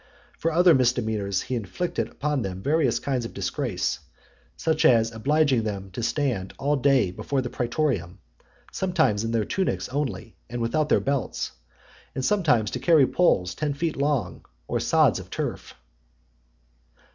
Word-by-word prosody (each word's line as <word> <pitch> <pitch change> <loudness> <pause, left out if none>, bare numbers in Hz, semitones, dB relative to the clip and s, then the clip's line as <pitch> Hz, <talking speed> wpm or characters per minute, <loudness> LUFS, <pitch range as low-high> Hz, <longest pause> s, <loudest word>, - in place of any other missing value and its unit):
For 165 - 0
other 175 +1 +6
misdemeanors 110 -7 +1
he - - -5
inflicted 120 - -2
upon 145 -1 -2
them 95 -2 -5
various 145 -5 +2
kinds 130 -3 -2
of 115 - -7
disgrace; 100 -2 -2 0.6
such 160 -1 0
as 115 -2 +5
obliging 135 +2 +2
them 100 -3 -5
to 120 - -5
stand 115 -7 -1
all 145 +2 +1
day 135 -8 +3
before 130 +7 -2
the 125 - -5
praetorium, 120 - -1 0.5
sometimes 160 - +1
in 115 - -2
their 115 -2 0
tunics 190 -1 -1
only, 125 -7 -3
and 120 +1 -4
without 145 +6 0
their - - +4
belts, 140 -3 -2 0.7
sometimes 145 - +2
to - - -3
carry 160 -5 +5
poles 95 - +2
ten 150 +5 -2
feet 165 +2 -2
long, 140 -3 -1 0.2
or - - -1
sods - - +3
of - - -10
turf. - - -5
125 Hz, 145 wpm, -25 LUFS, 110-150 Hz, 0.7 s, other